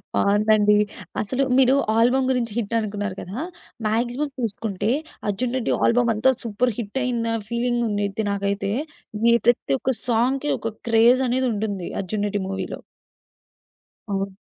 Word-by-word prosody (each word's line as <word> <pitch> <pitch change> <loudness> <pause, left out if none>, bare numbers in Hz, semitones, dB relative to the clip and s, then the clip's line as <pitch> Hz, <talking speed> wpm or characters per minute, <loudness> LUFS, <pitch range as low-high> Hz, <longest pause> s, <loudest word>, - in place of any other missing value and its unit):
బావుందండి. 210 0 +4 0.4
అసలు 255 +6 0
మీరు 265 0 +5 0.2
ఆల్బమ్ 250 +3 +3
గురించి 240 -3 -1
హిట్ 230 -1 -2
అనుకున్నారు 205 -2 -3
కదా! 195 +8 -6 0.5
మాక్సిమం 240 +6 0
చూసుకుంటే 215 -2 -2 0.4
'అర్జున్ 240 +5 -1
రెడ్డి' 245 - 0
ఆల్బమ్ 235 0 +3
అంతా 225 +5 +3
సూపర్ 230 +2 0
హిట్ 235 +3 -3
అయిందన్న 230 -2 0
ఫీలింగ్ 240 0 0
ఉంది 205 0 0 0.2
నాకైతే, 200 0 -1 0.6
ఈ - - +6
ప్రతి 240 - +3
ఒక్క 265 - 0
సాంగ్‌కి 255 +5 +1
ఒక 225 -1 -4 0.2
క్రేజ్ 235 +3 +5
అనేదుంటుంది 220 -7 -1
'అర్జున్ 205 +2 -2
రెడ్డి' 205 0 -2
మూవీలో. 195 0 -4 1.3
అవును. 195 0 -2
225 Hz, 130 wpm, -23 LUFS, 205-245 Hz, 1.3 s, ఈ